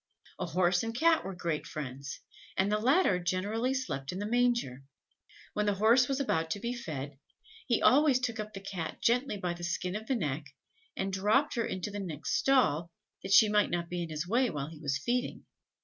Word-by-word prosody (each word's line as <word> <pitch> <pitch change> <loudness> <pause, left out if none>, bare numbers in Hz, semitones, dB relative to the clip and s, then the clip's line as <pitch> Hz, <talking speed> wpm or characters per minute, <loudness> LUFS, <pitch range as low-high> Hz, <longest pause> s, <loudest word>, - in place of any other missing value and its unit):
A - - -2
Horse 175 +1 +2
and 225 0 -4
Cat 325 +4 +4
were 190 -1 -5
great 170 -3 -3
friends, 135 -1 -6 0.4
and 195 +2 +2
the 210 - +2
latter 255 - +3
generally 200 +8 -1
slept 140 - -3
in 180 - -5
the 205 - -3
manger. 235 - +1 0.7
When 210 0 0
the 205 - +2
horse 230 +5 +5
was 275 0 -1
about 165 -12 0
to 185 - -2
be 235 +4 -3
fed, 145 - -6 0.5
he 235 -4 +1
always 280 -1 +5
took 230 -3 -3
up 215 0 -4
the 195 - -6
Cat 185 -4 -5
gently 245 -1 +2
by 180 -3 -2
the 175 0 -9
skin 180 +2 -2
of 220 +1 -5
the 265 - +1
neck, 145 - -3 0.4
and 195 0 -2
dropped 210 +10 +2
her 235 - -1
into 185 +2 -4
the 205 - -5
next 165 -6 -4
stall, 175 - +3 0.3
that 190 - -6
she 215 +2 +8
might 210 0 +3
not 170 -1 -2
be 175 0 -3
in 170 - -4
his 155 +2 -4
way 245 +5 +2
while 145 -3 -4
he 160 - -11
was 140 -3 -1
feeding. 245 - -2
195 Hz, 210 wpm, -31 LUFS, 165-235 Hz, 0.7 s, she